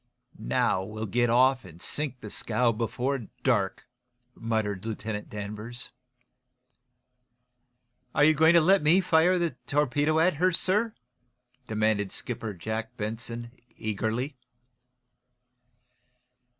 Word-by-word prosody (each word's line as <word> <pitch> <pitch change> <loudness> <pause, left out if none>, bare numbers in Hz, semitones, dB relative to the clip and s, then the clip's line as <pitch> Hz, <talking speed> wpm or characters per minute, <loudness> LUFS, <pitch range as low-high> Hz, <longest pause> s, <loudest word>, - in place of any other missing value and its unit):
"Now, 65 +9 +1
we'll 110 +3 -5
get 120 +3 +1
off 130 +2 +4
and 85 -3 -13
sink 135 +3 -3
the 105 - -8
scow, 115 +1 +1
before 120 +2 -2 0.2
dark," 105 -7 +1 0.5
muttered 110 -5 -2
Lieutenant 110 -1 -4
Danvers. 105 +4 -7 2.2
"Are - - +4
you 155 +1 +7
going 160 +2 +5
to 170 - +7
let 190 +5 +5
me 155 +5 +5
fire 180 0 +4
the 170 -2 0 0.2
torpedo 145 +2 +2
at 165 0 +3
her, 185 +3 +3
sir?" 210 +6 +1 0.7
demanded 110 -2 0
Skipper 115 -4 -4
Jack 110 +5 -4
Benson, 115 +2 -5 0.3
eagerly. 110 +6 -2
120 Hz, 110 wpm, -28 LUFS, 110-150 Hz, 2.2 s, you